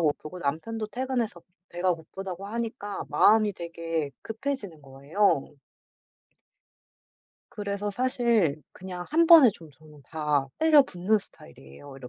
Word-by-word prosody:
고프고 155 +2 -2
남편도 210 +10 -3
퇴근해서 240 -5 -3 0.3
배가 175 +1 0
고프다고 185 +4 -8
하니까 225 -2 -5
마음이 215 -1 +4
되게 165 -3 -4
급해지는 220 - -5
거예요. 140 +5 0 2.0
그래서 205 0 -4
사실 230 - +1
그냥 180 -1 -8
1 330 +2 +4
번에 320 -7 +9
좀 165 -2 -14
저는 150 +1 -18
다 150 -3 0
때려 310 -3 +6
붓는 195 +1 0
스타일이에요 135 - -14
190 Hz, 270 characters per minute, -27 LUFS, 155-225 Hz, 2.0 s, 번에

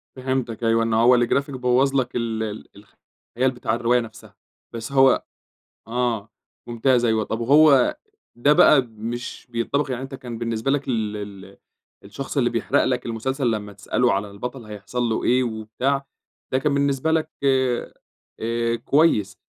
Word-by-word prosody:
فِهِمتك 130 -3 -3
أيوه 115 0 +3
إن 115 -1 -1
هو 120 +3 +5
الgraphic 140 +4 +1
بوَّظ 130 +1 +1
لَك 130 -2 0
ال 115 -2 -2
ال 110 -1 -6
الخيال 120 +5 -5
بتاع 120 -3 -2
الرواية 120 +1 +2
نفسها، 115 -2 -10 0.4
بس 115 +4 -6
هو 135 -1 +4 0.6
آه، 115 -2 -1 0.4
ممتاز 120 +1 +2
أيوه 110 -2 +2
طب 110 +2 -4
وهو 140 - +5 0.4
ده 140 +5 +4
بقى 150 -1 +6
مش 115 +3 -6
بينطبق 135 +5 -1
يعني 130 0 -3
أنتَ 135 +1 -7
كان 120 -3 -7
بالنسبة 115 +2 -2
لك 140 0 -1
ال 110 -4 -1
ال 100 -1 -9 0.5
الشخص - - -7
اللي - - +2
بيحرق - - +1
لَك 125 -1 -1
المسلسل 125 +3 -1
لما 105 -2 -4
تسأله 120 +5 0
على 100 +1 -2
البطل 125 +5 -7
هيحصل 105 +3 -5
له 115 -2 -1
إيه 125 +1 +3
وبتاع، 120 +5 -2 0.5
ده 130 - +3
كان 140 +2 0
بالنسبة 140 +1 +1
لك 160 -1 0
آآ 130 -3 +1 0.5
آآ، 115 +1 -1
كويس. 115 - +2
120 Hz, 155 wpm, -23 LUFS, 110-130 Hz, 0.6 s, بقى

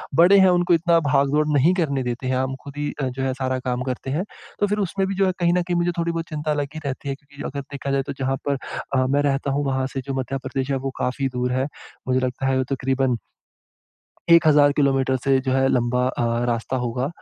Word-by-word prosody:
बड़े 180 +5 +7
हैं 190 -1 +6
उनको 175 0 +3
इतना 170 0 +4
भाग-दौड़ 145 +1 +2
नहीं 160 +7 +4
करने 140 -7 0
देते 125 +1 -3
हैं। 130 - +1
हम 130 0 -1
खुद 140 0 -10
ही 145 0 -2
जो 135 0 -2
है 130 - 0
सारा 130 0 -2
काम 125 -1 -2
करते 130 +1 -4
हैं। 165 +6 0 0.4
तो 205 - +2
फिर 210 - 0
उसमें 195 +2 -1
भी 195 - -3
जो 195 +1 +2
है 185 - +2
कहीं 175 -1 +3
न 180 - +2
कहीं 175 0 -2
मुझे 175 0 +1
थोड़ी-बहुत 170 0 -1
चिंता 150 0 -2
लगी 145 +1 -3
रहती 140 +1 -4
है 135 - -2
क्योंकि 145 0 -12
अगर 140 0 -4
देखा 140 -1 -4
जाए 135 0 +1
तो 140 - -3
जहाँ 135 0 0
पर 140 -1 +1 0.4
अ, 130 0 +3
मैं 140 +2 +2
रहता 140 -1 0
हूँ 145 +1 0
वहाँ 130 -1 0
से 135 - -2
जो 135 - -2
मध्य 135 +1 -2
प्रदेश 135 +1 -3
है 135 - +1
वो - - -3
काफ़ी 130 +2 -1
दूर 125 0 0
है। 130 +2 0 0.4
मुझे 130 0 +2
लगता 130 +1 -2
है 135 0 +2
वो 130 - +2
तक़रीबन 130 -2 0 1.1
1000 150 -4 +6
किलोमीटर 135 -2 +2
से 135 -1 +3
जो 130 - +1
है 135 0 +3
लंबा 125 0 +1
अ, 120 -2 -1
रास्ता 120 +1 -1
होगा। 125 +3 -1
135 Hz, 235 wpm, -23 LUFS, 130-150 Hz, 1.1 s, बड़े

